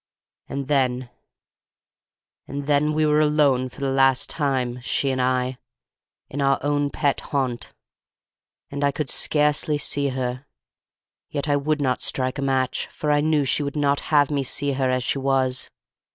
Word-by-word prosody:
And 140 -1 -4
then—and 130 +1 -6
then—we 150 +2 +2
were 150 0 +3
alone 145 -4 +3
for 140 - -13
the 135 -1 0
last 135 -1 +3
time, 130 -4 -1
she 135 +2 0
and 130 -1 -1
I, 125 0 0 0.7
in 145 - -4
our 135 0 +3
own 145 0 +1
pet 140 0 0
haunt; 130 -4 -3 1.0
and 140 0 -3
I 140 - +4
could 145 -1 -3
scarcely 150 0 +1
see 140 -1 0
her, 130 0 -3 0.8
yet 145 0 -3
I 145 - +2
would 150 +1 0
not 130 -2 0
strike 130 +1 0
a - - -1
match, 130 -2 0
for 150 - -2
I 145 0 +3
knew 150 -2 +2
she 135 - +1
would 140 0 -3
not 145 -1 +2
have 145 -2 +4
me 145 -1 +1
see 140 +2 -1
her 130 -1 0
as 130 -1 0
she 135 - 0
was. 130 -1 0
140 Hz, 160 wpm, -23 LUFS, 130-145 Hz, 1.0 s, I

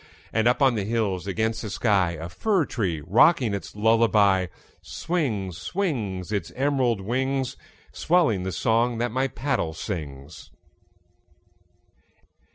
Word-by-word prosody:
And 110 +1 +2
up 125 +4 +3
on 135 -2 +5
the 105 -3 -1
hills 100 -4 -1
against 110 +3 -1
the 110 - -5
sky, 95 -2 +1
A 85 +1 -6
fir 185 - 0
tree 90 - -2
rocking 120 - +4
its 100 - -6
lullaby, 105 -4 +3 0.3
Swings, 110 - -3
swings, 105 - -3
Its 100 -6 -2
emerald 130 -5 +1
wings, 130 +4 -1 0.4
Swelling 155 - +2
the 95 +1 -3
song 115 +6 +1
that 120 0 -1
my 130 +3 0
paddle 130 - -2
sings. 75 -5 -7
110 Hz, 125 wpm, -25 LUFS, 95-130 Hz, 0.4 s, on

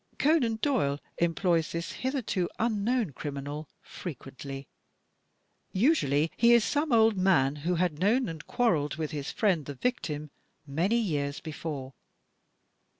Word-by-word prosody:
Conan 275 -6 +3
Doyle 175 - +1 0.2
employs 170 -1 +1
this 170 0 -3
hitherto 255 -9 -1
unknown 225 - +1
criminal 145 +2 -5
frequently. 135 -4 -8 1.1
Usually 165 - +3
he 235 0 +5
is 235 -2 +6
some 295 +3 0
old 225 -2 +5
man 150 -7 +3
who 170 +5 -1
had 170 -3 0
known 230 +8 +3
and 160 -3 -6
quarreled 170 - +1
with 155 -1 -3
his 145 -3 -4
old - - -5
friend, 185 -9 +2
the 145 - -5
victim, 150 - -2 0.3
many 170 +11 +1
years 145 -10 -1
before. 145 -4 -6
170 Hz, 130 wpm, -29 LUFS, 145-225 Hz, 1.1 s, is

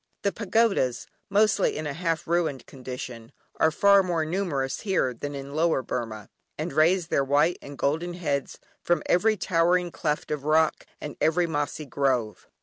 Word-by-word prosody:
The 200 - +2
pagodas, 195 - +1 0.2
mostly 205 -1 +2
in 155 - -4
a 145 - -3
half 165 0 -2
ruined 165 -5 0
condition, 125 -3 -8 0.3
are 160 - +4
far 200 +5 +5
more 170 -4 -1
numerous 155 -6 -2
here 190 - 0
than 145 +4 -6
in 140 0 -7
Lower 160 -3 +1
Burmah, 110 -5 -5 0.3
and - - -4
raise 165 +3 +3
their 140 - +2
white 145 +5 +2
and 140 0 -10
golden 165 +6 -1
heads 145 -6 -2 0.2
from 175 -3 +1
every 215 +5 +3
towering 175 0 +1
cleft 150 -3 -2
of 150 -2 -2
rock, 155 +1 +2
and 150 - -7
every 165 +3 +3
mossy 150 -1 -3
grove. 130 -5 -1
155 Hz, 160 wpm, -26 LUFS, 140-175 Hz, 0.3 s, far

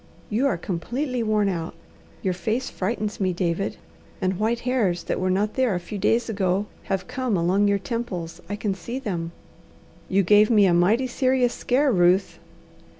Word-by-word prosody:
You 240 +7 +2
are 225 - 0
completely 240 - -3
worn 215 -2 +2
out. 170 -3 -3 0.5
Your 185 - +1
face 220 +8 -2
frightens 210 +2 -3
me, 185 -2 +1
David, 175 +2 -1 0.4
and 185 -1 -1
white 230 +2 0
hairs 220 -9 0
that - - -2
were 185 - 0
not 205 +3 +1
there 255 -7 +1
a - - -1
few 200 +4 -7
days 230 +4 +2
ago 195 -2 0 0.2
have 195 -2 -2
come 255 -6 -1
along 185 +4 +2
your 200 0 +3
temples. 180 -5 -5
I 205 - -2
can 205 -1 -1
see 195 +7 -6
them." 175 -10 -3 0.8
"You 195 +1 +3
gave 210 +3 +5
me 210 -4 +5
a 180 - +4
mighty 200 +9 +3
serious 255 -1 +1
scare, 270 +3 +1
Ruth." 180 -1 +2
205 Hz, 175 wpm, -24 LUFS, 185-235 Hz, 0.8 s, gave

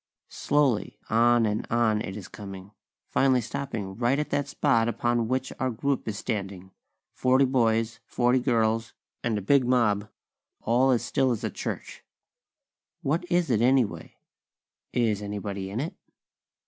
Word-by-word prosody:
Slowly, 140 -7 +1
on 120 +1 +4
and 105 0 -2
on 110 -2 +2
it 95 0 -5
is 95 - -8
coming; 100 -1 -9 0.4
finally 130 -1 +3
stopping 115 -5 -4
right 120 +4 +1
at 150 - -2
that 140 -1 0
spot 125 -5 +2
upon 120 -1 0
which 130 +2 -2
our 130 - +1
group 135 +3 -2
is 105 -2 -3
standing; 95 -3 -4 0.4
forty 130 +2 +3
boys, 115 -3 +1
forty 125 +1 +2
girls, 115 -2 +1 0.3
and 115 -3 0
a 105 - -4
big 140 +6 +4
mob, 110 -4 +2 0.5
all 125 +4 +3
as 125 -3 +2
still 135 -2 +1
as 120 -4 -2
a - - -1
church. - - -6 1.0
What 170 +6 -1
is 175 -5 +2
it, 110 -2 +2
anyway? 125 -2 +1 0.8
Is 110 -4 +1
anybody 100 -1 -4
in 105 +4 -4
it? 155 +6 -3
120 Hz, 145 wpm, -27 LUFS, 105-130 Hz, 1.0 s, on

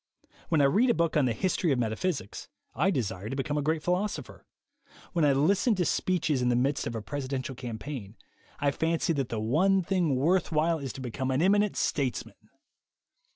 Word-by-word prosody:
When 160 -3 +3
I - - +4
read 205 - +4
a - - +3
book 170 0 0
on 150 -3 +4
the 125 - +1
history 180 - 0
of 135 - +2
metaphysics, 120 - -3 0.2
I 155 +10 +2
desire 110 - -2
to 135 - -3
become 145 +2 -1
a - - 0
great 155 +1 -1
philosopher. 185 +4 -2 0.7
When 170 -3 +1
I 145 - +5
listen 195 - +3
to 180 -2 0
speeches 160 -8 0
in 125 - +2
the 120 - +2
midst 135 +4 0
of 115 - -4
a 110 - -4
presidential 135 0 -4
campaign, 120 -3 -7 0.4
I 140 0 +2
fancy 165 +2 0
that 135 -5 -2
the 115 - -3
one 180 - +2
thing 175 -6 +1
worth 170 +8 +1
while 160 +1 +2
is 135 -3 -4
to 135 - -8
become 130 +2 -3
an 130 +4 +1
eminent 205 +2 +3
statesman. 135 -4 -2
145 Hz, 195 wpm, -28 LUFS, 130-175 Hz, 0.7 s, I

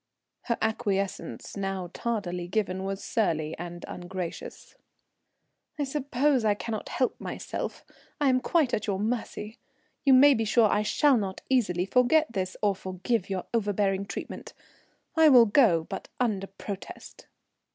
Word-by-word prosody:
Her 235 - 0
acquiescence, 200 -3 -2
now 195 -3 -3
tardily 180 -7 -3
given, 190 -1 -1
was 195 0 -4
surly 160 -8 0
and 175 0 -7
ungracious. 180 -1 -7 1.0
"I 295 - 0
suppose 275 -1 +1
I 210 -2 +3
cannot 215 0 -5
help 255 - -1
myself; - - -5 0.3
I 290 - +2
am 255 0 +3
quite 300 -6 +1
at 215 - -1
your 200 -2 0
mercy. 220 0 -3 0.4
You 275 -2 +5
may 280 +2 +8
be 225 - 0
sure 220 +1 +4
I 210 - +2
shall 265 +5 +3
not 195 -3 -3
easily 185 -9 +2
forget 250 +6 +3
this, 185 -2 -3
or 205 -1 +4
forgive 190 +3 -2
your 190 -2 -3
overbearing 200 -3 0
treatment. - - -7 0.6
I 320 -1 +7
will 245 -4 +8
go, 205 - +4
but - - -7
under 210 -6 0
protest." 195 0 -9
210 Hz, 140 wpm, -27 LUFS, 190-245 Hz, 1.0 s, may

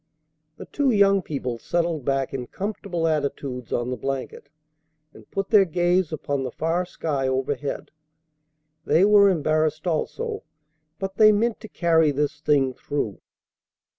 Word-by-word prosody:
The - - -8
two 285 -2 0
young 200 -3 +4
people 130 -8 -4
settled 165 -1 -1
back 135 -1 0
in 125 -2 -4
comfortable 190 - -3
attitudes 140 -5 -2
on 120 +1 -1
the - - -1
blanket, 135 +3 -5 0.6
and - - -16
put 195 0 -3
their 210 -3 +7
gaze 175 0 +1
upon 145 -2 -2
the 130 - -3
far 165 +7 -1
sky 145 -6 -2
overhead. 135 +2 -2 0.9
They 165 +6 +4
were 205 -1 +6
embarrassed 155 -2 0
also, 430 - -2 0.6
but 195 +1 -5
they 215 -1 +7
meant 220 +2 +1
to 220 - -10
carry 165 -5 +2
this 145 0 -1
thing 140 -4 +2
through. 125 -7 -4
155 Hz, 140 wpm, -24 LUFS, 140-195 Hz, 0.9 s, their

